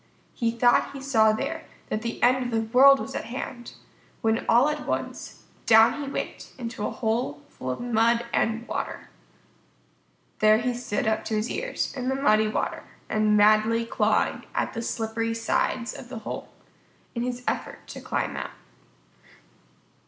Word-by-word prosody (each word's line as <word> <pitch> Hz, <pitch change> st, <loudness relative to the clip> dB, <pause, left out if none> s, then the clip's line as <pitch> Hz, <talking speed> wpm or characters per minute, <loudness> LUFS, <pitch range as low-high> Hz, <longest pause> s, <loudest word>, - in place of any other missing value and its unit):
He 230 Hz, -2 st, 0 dB
thought 240 Hz, +3 st, +3 dB
he 275 Hz, -, -7 dB
saw 230 Hz, -5 st, +4 dB
there 215 Hz, -, -3 dB, 0.3 s
that 215 Hz, -, -2 dB
the 235 Hz, 0 st, -4 dB
end 255 Hz, +1 st, +4 dB
of 245 Hz, -, -3 dB
the 225 Hz, -1 st, 0 dB
world 275 Hz, +1 st, +8 dB
was 270 Hz, -, -6 dB
at -, -, -4 dB
hand, 240 Hz, -1 st, -6 dB, 0.5 s
when 225 Hz, 0 st, +1 dB
all 245 Hz, +5 st, +6 dB
at 300 Hz, 0 st, -3 dB
once, -, -, -4 dB, 0.2 s
down 225 Hz, +6 st, +6 dB
he 280 Hz, -, -4 dB
went -, -, -5 dB
into 230 Hz, -4 st, -4 dB
a -, -, -2 dB
hole 220 Hz, -, -2 dB
full 130 Hz, -, -7 dB
of 125 Hz, -, -3 dB
mud 235 Hz, 0 st, +2 dB
and 225 Hz, +1 st, 0 dB
water. -, -, -4 dB, 1.3 s
There 215 Hz, 0 st, +6 dB
he 245 Hz, +2 st, -1 dB
stood 240 Hz, -4 st, -2 dB
up 220 Hz, 0 st, +1 dB
to 220 Hz, -, -1 dB
his 215 Hz, +3 st, -1 dB
ears, -, -, -3 dB
in 255 Hz, -1 st, -2 dB
the 265 Hz, -, 0 dB
muddy 215 Hz, -5 st, +3 dB
water, 215 Hz, -, -2 dB, 0.3 s
and 215 Hz, -1 st, +3 dB
madly 215 Hz, +2 st, +4 dB
clawing -, -, +1 dB
at -, -, -1 dB
the 230 Hz, -, -3 dB
slippery 225 Hz, 0 st, -2 dB
sides 235 Hz, +1 st, -1 dB
of 245 Hz, -, -10 dB
the 255 Hz, -, -6 dB
hole -, -, -5 dB, 0.6 s
in 235 Hz, -, -3 dB
his 250 Hz, 0 st, -3 dB
effort -, -, -3 dB
to -, -, -8 dB
climb -, -, -2 dB
out. -, -, -4 dB
230 Hz, 165 wpm, -26 LUFS, 220-250 Hz, 1.3 s, world